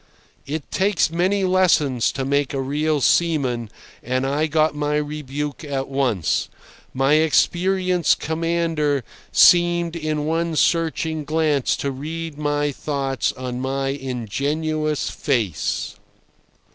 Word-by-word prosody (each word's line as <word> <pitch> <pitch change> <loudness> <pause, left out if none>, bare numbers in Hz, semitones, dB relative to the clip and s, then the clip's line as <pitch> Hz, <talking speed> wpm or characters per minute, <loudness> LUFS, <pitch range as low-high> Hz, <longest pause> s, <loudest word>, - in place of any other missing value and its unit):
It 150 +1 -5
takes 190 -4 +1
many 185 +4 +1
lessons 170 -9 +2
to 135 - -3
make 140 0 0
a - - -1
real 145 +2 0
seaman, 130 -7 +1 0.3
and 130 +2 -1
I 145 +3 0
got 155 0 +2
my 150 0 -1
rebuke 150 -1 -4
at 135 -3 -3
once. 130 - 0 0.4
My 135 +2 +2
experienced 175 +2 +2
commander 160 -3 0 0.3
seemed 175 -1 +5
in 155 -2 -2
one 165 +1 -1
searching 160 -1 +1
glance 150 -2 +1
to 140 - -2
read 160 +3 -6
my 145 0 0
thoughts 135 -3 -2
on 125 -1 -5
my 135 +1 -1
ingenuous 145 +4 -2
face. 115 - -2
150 Hz, 115 wpm, -22 LUFS, 135-160 Hz, 0.4 s, seemed